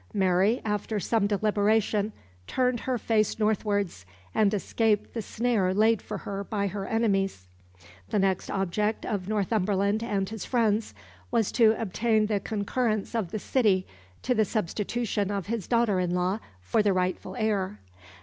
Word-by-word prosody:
Mary, 190 Hz, +4 st, +3 dB
after 210 Hz, 0 st, -1 dB
some 205 Hz, +2 st, +1 dB
deliberation, 210 Hz, 0 st, +1 dB, 0.4 s
turned 250 Hz, -2 st, +1 dB
her 255 Hz, +1 st, -1 dB
face 215 Hz, -2 st, +1 dB
northwards, 205 Hz, -, 0 dB, 0.3 s
and 205 Hz, -2 st, +3 dB
escaped 210 Hz, +1 st, 0 dB
the 230 Hz, -, -2 dB
snare 215 Hz, -4 st, 0 dB
laid 220 Hz, +1 st, +3 dB
for 210 Hz, -, -5 dB
her 200 Hz, 0 st, -5 dB
by 200 Hz, 0 st, -2 dB
her 195 Hz, 0 st, -3 dB
enemies. 195 Hz, -, 0 dB, 0.6 s
The -, -, 0 dB
next 190 Hz, -2 st, +1 dB
object 205 Hz, +3 st, -1 dB
of 200 Hz, -5 st, -2 dB
Northumberland 205 Hz, 0 st, +1 dB
and 200 Hz, -4 st, -1 dB
his 220 Hz, -1 st, -6 dB
friends 225 Hz, -3 st, +1 dB, 0.3 s
was 230 Hz, -4 st, +1 dB
to 225 Hz, -2 st, +4 dB
obtain 220 Hz, +1 st, +1 dB
the 210 Hz, -1 st, 0 dB
concurrence 215 Hz, +2 st, -1 dB
of 220 Hz, -7 st, -1 dB
the 215 Hz, -, -3 dB
City 205 Hz, -5 st, +2 dB, 0.4 s
to 250 Hz, -, +2 dB
the 220 Hz, -2 st, +3 dB
substitution 210 Hz, +1 st, -1 dB
of 200 Hz, -2 st, -2 dB
his 220 Hz, -2 st, -3 dB
daughter 235 Hz, -5 st, +2 dB
in 180 Hz, -1 st, 0 dB
law 180 Hz, +4 st, 0 dB, 0.2 s
for 215 Hz, -, +2 dB
the 205 Hz, -2 st, +2 dB
rightful 185 Hz, 0 st, -2 dB
heir. 210 Hz, -3 st, -1 dB
210 Hz, 150 wpm, -27 LUFS, 195-225 Hz, 0.6 s, to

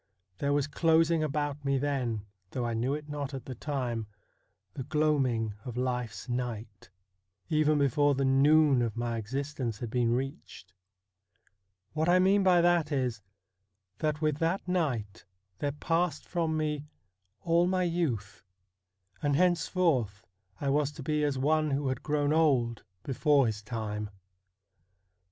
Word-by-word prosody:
There 140 Hz, -, 0 dB
was 145 Hz, -1 st, +2 dB
closing 165 Hz, +1 st, +3 dB
about 145 Hz, -1 st, -2 dB
me 140 Hz, -1 st, +1 dB
then, 130 Hz, -6 st, -1 dB, 0.2 s
though 125 Hz, +3 st, -3 dB
I 120 Hz, -, -1 dB
knew 125 Hz, +5 st, 0 dB
it 150 Hz, 0 st, -7 dB
not 145 Hz, -2 st, -4 dB
at 135 Hz, -, -7 dB
the 130 Hz, -, -6 dB
time, 120 Hz, -4 st, -3 dB, 0.7 s
the -, -, -6 dB
gloaming 130 Hz, -6 st, +1 dB
of 125 Hz, -2 st, -7 dB
life's 125 Hz, -4 st, -3 dB
night, 120 Hz, -4 st, -5 dB, 0.6 s
even 155 Hz, 0 st, +3 dB
before 145 Hz, +1 st, +3 dB
the 135 Hz, 0 st, 0 dB
noon 140 Hz, 0 st, +5 dB
of 115 Hz, -2 st, -2 dB
my 120 Hz, -1 st, -2 dB
existence 125 Hz, 0 st, -3 dB
had 115 Hz, 0 st, -6 dB
been 120 Hz, -1 st, +1 dB
reached. 130 Hz, -, -6 dB, 1.2 s
What 155 Hz, +2 st, 0 dB
I 180 Hz, -, +6 dB
mean 190 Hz, +2 st, +4 dB
by 180 Hz, -2 st, +5 dB
that 170 Hz, -3 st, +2 dB
is, 125 Hz, -6 st, -1 dB, 0.8 s
that 155 Hz, 0 st, -1 dB
with 155 Hz, -2 st, +1 dB
that 165 Hz, +4 st, -1 dB
night 125 Hz, -, -2 dB, 0.3 s
there 145 Hz, -, -1 dB
passed 165 Hz, +3 st, -1 dB
from 165 Hz, -3 st, -1 dB
me 150 Hz, -1 st, -2 dB, 0.5 s
all 170 Hz, +1 st, +3 dB
my 185 Hz, 0 st, +1 dB
youth, 160 Hz, -, -2 dB, 0.8 s
and 145 Hz, -1 st, +1 dB
henceforth 160 Hz, -, +1 dB, 0.3 s
I 140 Hz, -, -1 dB
was 145 Hz, +1 st, +1 dB
to 145 Hz, -, -8 dB
be 150 Hz, +2 st, 0 dB
as 145 Hz, -2 st, 0 dB
one 155 Hz, +3 st, +2 dB
who 140 Hz, -1 st, 0 dB
had 130 Hz, -1 st, -3 dB
grown 150 Hz, -1 st, 0 dB
old 130 Hz, -8 st, +2 dB, 0.2 s
before 140 Hz, 0 st, +3 dB
his 110 Hz, -2 st, -2 dB
time. 105 Hz, -2 st, -4 dB
140 Hz, 145 wpm, -29 LUFS, 120-155 Hz, 1.2 s, I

